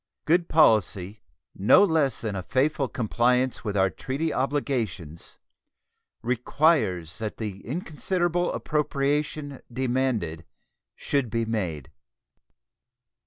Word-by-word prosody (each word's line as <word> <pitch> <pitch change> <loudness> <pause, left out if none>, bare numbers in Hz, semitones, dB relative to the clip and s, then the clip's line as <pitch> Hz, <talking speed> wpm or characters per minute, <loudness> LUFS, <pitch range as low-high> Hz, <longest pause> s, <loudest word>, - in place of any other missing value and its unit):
Good 170 +2 +2
policy, 105 - +3 0.3
no 100 - +5
less 160 - +2
than 110 -3 -3
a 95 - -2
faithful 135 - 0
compliance 125 +2 +1
with 105 -3 -2
our 95 -1 +3
treaty 145 +5 -3
obligations, 120 - -2 0.9
requires 120 - +1
that 110 -1 -4
the 100 -3 -5
inconsiderable 175 - -1
appropriation 145 -1 -1
demanded 120 -10 -1 0.5
should 140 -5 -1
be 115 +1 -1
made. 90 - -3
125 Hz, 95 wpm, -26 LUFS, 105-150 Hz, 0.9 s, no